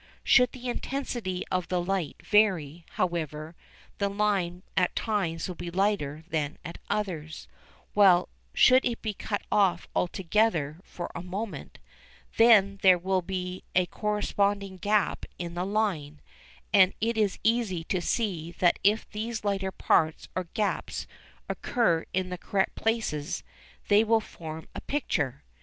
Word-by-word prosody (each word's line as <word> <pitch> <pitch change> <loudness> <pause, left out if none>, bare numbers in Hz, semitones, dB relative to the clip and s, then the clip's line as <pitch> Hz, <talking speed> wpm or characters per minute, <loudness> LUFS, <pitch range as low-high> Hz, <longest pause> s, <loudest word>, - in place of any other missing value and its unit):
Should 250 -1 +5
the 255 -1 -7
intensity 240 -7 -3
of 185 -1 0
the 180 - 0
light 175 -2 -1
vary, 175 -7 +2
however, 160 -2 -2 0.4
the 200 -1 +1
line 195 -3 0
will 185 - +4
at - - -8
times 195 -7 -1
be 175 0 -5
lighter 170 -5 0
than 150 -3 -2
at 170 - -7
others, 175 -7 -3 0.5
while, 190 -4 +6 0.2
should 260 0 +6
it 235 -1 -2
be 215 -2 -1
cut 205 +1 -4
off 185 -4 +2
altogether 175 -4 +1
for 175 - -7
a 170 - -5
moment, 195 +4 -6 0.6
then 205 -4 +6
there 185 -2 +7
will 185 +1 0
be 180 0 -4
a 180 0 +4
corresponding 200 -1 -1
gap 205 +1 0
in 170 -1 -5
the 180 +2 -2
line, 190 -9 -1 0.5
and 190 -2 +6
it 230 +2 0
is 210 -3 +1
easy 225 -7 +1
to 180 +2 -1
see 175 -5 -1
that 175 -1 +2
if 210 +3 +3
these 220 +1 -4
lighter 195 -2 -1
parts 160 -3 +1
or 185 - -1
gaps 215 -3 -1 0.4
occur 170 -10 +1
in 185 0 -1
the 180 -1 -5
correct 195 +1 0
places 215 -9 -1 0.4
they 205 +1 +5
will 225 0 +3
form 160 -6 -9
a - - -6
picture. 145 - -2
190 Hz, 145 wpm, -28 LUFS, 170-210 Hz, 0.6 s, there